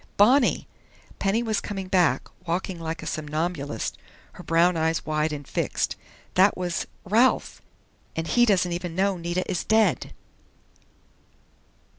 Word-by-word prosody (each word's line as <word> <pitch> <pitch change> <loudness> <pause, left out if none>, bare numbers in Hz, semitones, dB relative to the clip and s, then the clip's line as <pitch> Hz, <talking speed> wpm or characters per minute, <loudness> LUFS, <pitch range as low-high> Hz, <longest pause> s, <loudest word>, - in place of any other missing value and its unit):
"Bonnie!" 245 +6 +4 0.5
Penny 205 +4 +1
was 220 -3 0
coming 195 -2 -5
back, 180 -8 +2 0.2
walking 175 +1 -2
like 160 0 -5
a - - -7
somnambulist, 155 -4 -3 0.3
her - - -11
brown 170 +2 +3
eyes 160 0 0
wide 155 0 0
and 145 -2 -6
fixed. - - -1 0.4
"That 190 +2 +4
was 175 -2 -2 0.2
Ralph!... 230 +7 +2 0.5
_And 165 - -2
he 240 +8 +3
doesn't 185 -4 +2
even 175 -1 -4
know 195 +1 +2
Nita 175 +2 -2
is 175 - -2
dead! 220 -4 +2
180 Hz, 130 wpm, -25 LUFS, 160-195 Hz, 0.5 s, Bonnie